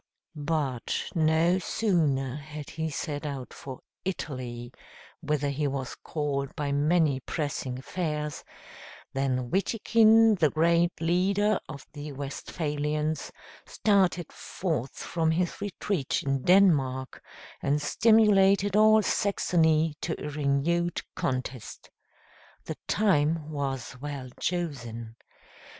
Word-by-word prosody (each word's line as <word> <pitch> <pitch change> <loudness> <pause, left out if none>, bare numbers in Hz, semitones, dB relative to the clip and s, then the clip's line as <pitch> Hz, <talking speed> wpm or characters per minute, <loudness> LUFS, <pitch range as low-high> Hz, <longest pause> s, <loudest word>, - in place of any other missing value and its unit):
But 145 -5 -2
no 165 +2 +3
sooner 155 - 0
had 150 0 -8
he 160 0 -3
set 145 0 -4
out 140 -4 -5
for 130 -2 -9 0.2
Italy, 125 -9 -5 0.5
whither 150 -2 0
he 145 +1 -1
was 135 -2 -3
called 140 -3 -3
by 145 -1 -2
many 150 -1 +2
pressing 135 -3 -3
affairs, 150 +1 -3 0.7
than 130 -2 -1
Witikind, 220 +1 +4
the 155 -3 +4
great 170 +2 +2
leader 190 +5 +2
of 140 -3 -8
the 145 0 -7
Westphalians, 150 +2 -3 0.4
started 190 -5 +1
forth 155 -9 -3
from 165 -2 -1
his 175 +3 -1
retreat 195 -6 -2
in 135 -1 0
Denmark 140 -8 +3 0.4
and 145 +2 +1
stimulated 200 +2 +4
all 215 0 +6
Saxony 160 -7 +2
to 165 - -3
a - - -4
renewed 150 +4 0
contest. 130 -2 -4 0.7
The - - -5
time 160 -6 +2
was 135 -3 -3
well 140 -3 -5
chosen. 120 -10 -3
150 Hz, 105 wpm, -28 LUFS, 140-175 Hz, 0.7 s, all